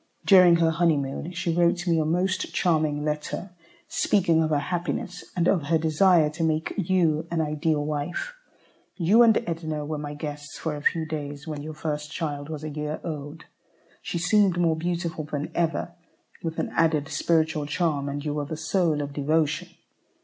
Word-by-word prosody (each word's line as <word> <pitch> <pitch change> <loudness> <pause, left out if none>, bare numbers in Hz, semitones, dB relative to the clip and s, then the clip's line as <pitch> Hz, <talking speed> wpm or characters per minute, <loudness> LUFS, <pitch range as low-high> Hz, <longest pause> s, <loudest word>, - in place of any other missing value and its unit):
During 180 -3 +7
her 165 -1 +3
honeymoon, 160 -2 0
she 170 -1 -1
wrote 175 +1 +2
me 165 -2 +2
a 155 - +1
most 185 +4 0
charming 155 -4 +1
letter 150 +5 -3 0.4
speaking 170 -5 +2
of 160 - +1
her 150 - +2
happiness, 175 +3 -3
and 175 -1 +2
of 170 -7 +2
her 165 +1 +3
desire 160 0 +4
to 165 +2 -3
make 160 0 0
you 165 -3 +1
an 170 - -1
ideal 155 -1 0
wife. 155 - -3 0.6
You 200 +6 +4
and 230 -2 +6
Edna 160 -3 -3
were 155 0 -3
my 145 0 -5
guests 145 -1 -7
for 160 -2 -3
a 145 - -6
few 160 +2 +1
days 145 -1 -5
when 150 -2 -4
your 155 +1 -7
first 150 -1 -4
child 145 -4 -4
was 155 -1 -6
a 155 - -4
year 150 +1 -4
old. 150 -1 -6 0.6
She - - -4
seemed 185 +1 +3
more 170 -2 +2
beautiful 170 -1 -2
than 145 -1 -4
ever, 170 0 -1 0.5
with 165 -1 -4
an - - -1
added 155 -3 +1
spiritual 155 -3 +1
charm, 150 -3 0
and 145 +1 -5
you 150 - -1
were 145 -1 -2
the 155 +2 -5
soul 160 -2 +1
of 140 0 -6
devotion. 150 +1 0
160 Hz, 180 wpm, -25 LUFS, 150-170 Hz, 0.6 s, During